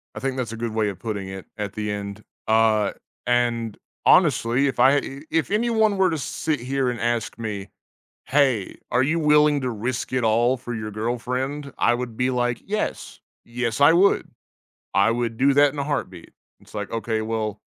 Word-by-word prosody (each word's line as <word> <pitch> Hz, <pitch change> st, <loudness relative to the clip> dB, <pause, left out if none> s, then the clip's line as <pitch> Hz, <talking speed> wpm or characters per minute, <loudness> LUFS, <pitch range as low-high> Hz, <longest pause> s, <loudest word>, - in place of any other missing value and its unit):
I -, -, -5 dB
think 135 Hz, 0 st, -2 dB
that's 125 Hz, -3 st, -3 dB
a 115 Hz, -, -6 dB
good 115 Hz, -1 st, -3 dB
way 110 Hz, -1 st, +1 dB
of 95 Hz, -, -8 dB
putting 100 Hz, -4 st, -4 dB
it 95 Hz, -1 st, -8 dB
at 105 Hz, -2 st, -4 dB
the 105 Hz, 0 st, -3 dB
end, 100 Hz, 0 st, -6 dB, 0.2 s
uh, 110 Hz, -2 st, +3 dB, 0.3 s
and 120 Hz, -3 st, 0 dB, 0.3 s
honestly, 125 Hz, +5 st, +4 dB
if 130 Hz, -3 st, -3 dB
I 135 Hz, +3 st, +6 dB
i 135 Hz, 0 st, -4 dB
if 165 Hz, +4 st, 0 dB
anyone 220 Hz, -2 st, +2 dB
were 190 Hz, -1 st, +4 dB
to 160 Hz, -, -1 dB
sit 150 Hz, 0 st, -2 dB
here 130 Hz, +1 st, -1 dB
and 120 Hz, -2 st, -4 dB
ask 120 Hz, -2 st, -1 dB
me, 105 Hz, -3 st, -5 dB, 0.6 s
"Hey, 130 Hz, -8 st, +1 dB
are 125 Hz, -, +3 dB
you 160 Hz, +5 st, +1 dB
willing 150 Hz, -1 st, +4 dB
to 130 Hz, -1 st, -2 dB
risk 120 Hz, +4 st, -3 dB
it 125 Hz, -2 st, +1 dB
all 120 Hz, +3 st, +3 dB
for 120 Hz, -1 st, -6 dB
your 110 Hz, -1 st, -4 dB
girlfriend." 125 Hz, +6 st, -3 dB
I 120 Hz, -, +3 dB
would 120 Hz, -2 st, -4 dB
be 125 Hz, +2 st, +1 dB
like, 120 Hz, -1 st, -1 dB
"Yes, 210 Hz, +2 st, -3 dB, 0.2 s
yes, 120 Hz, 0 st, -3 dB
I 145 Hz, +3 st, +8 dB
would. 185 Hz, +4 st, +3 dB, 0.7 s
I 100 Hz, +3 st, +4 dB
would 115 Hz, -1 st, -1 dB
do 135 Hz, +1 st, +4 dB
that 145 Hz, 0 st, +5 dB
in 150 Hz, -, -9 dB
a 140 Hz, -, -1 dB
heartbeat." 130 Hz, -, -4 dB, 0.3 s
It's -, -, -20 dB
like, -, -, -4 dB
okay, 115 Hz, -1 st, -2 dB
well, 110 Hz, -1 st, -3 dB
120 Hz, 195 wpm, -23 LUFS, 110-140 Hz, 0.7 s, I